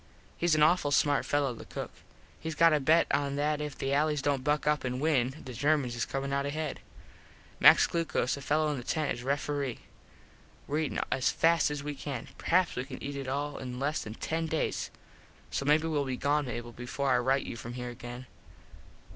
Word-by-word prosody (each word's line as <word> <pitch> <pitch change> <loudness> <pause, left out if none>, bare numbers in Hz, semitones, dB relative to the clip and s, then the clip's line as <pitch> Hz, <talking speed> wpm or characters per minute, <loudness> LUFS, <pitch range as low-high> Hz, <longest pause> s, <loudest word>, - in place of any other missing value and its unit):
Hes 170 -2 +3
an 150 - +4
awful 155 -1 +4
smart 145 0 +3
fello 145 -3 +1
the 115 - -10
cook. - - -6 0.5
Hes 160 -1 -3
got 165 +1 +6
a 150 - +3
bet 160 +4 +4
on 140 -1 0
that 150 +1 0
if 150 -1 -5
the 135 +1 -1
allys 150 0 +1
dont 140 -3 +1
buck 150 +2 +1
up 150 0 +2
an 125 0 -2
win 135 -4 +1
the 130 - -7
Germans 140 -1 +1
is 115 - -2
comin 135 0 -3
out 140 0 0
ahead. 155 0 -3 0.8
Max - - +8
Glucos, 165 -6 0
a 140 - -8
fello 150 +2 +1
in 145 - -2
the - - -7
tent, 155 +4 -1
is - - -8
refere. 140 -1 -1 0.9
Were 150 +2 -1
all - - +1
eatin 150 - -2
as 130 - +2
fast 165 -1 +3
as 145 -1 -4
we 150 0 -3
can. 135 -3 -6
Perhaps 180 +2 +2
we 125 - -2
can 130 -1 -9
eat 140 0 -4
it 135 -1 -5
all 145 +2 -2
in 125 -1 -6
less 145 +3 0
than 105 +1 -7
ten 165 +5 -2
days. 160 0 -1 0.6
So 140 - -2
maybe 155 +2 +3
well 150 -3 0
be 130 -1 -3
gone, 145 +1 +1
Mable, 120 -1 -5
before 125 +3 -2
I 125 - +4
rite 135 +2 +1
you - - -5
from 115 +1 -7
here 125 0 -5
again. 120 +1 -8
145 Hz, 215 wpm, -30 LUFS, 130-150 Hz, 0.9 s, Max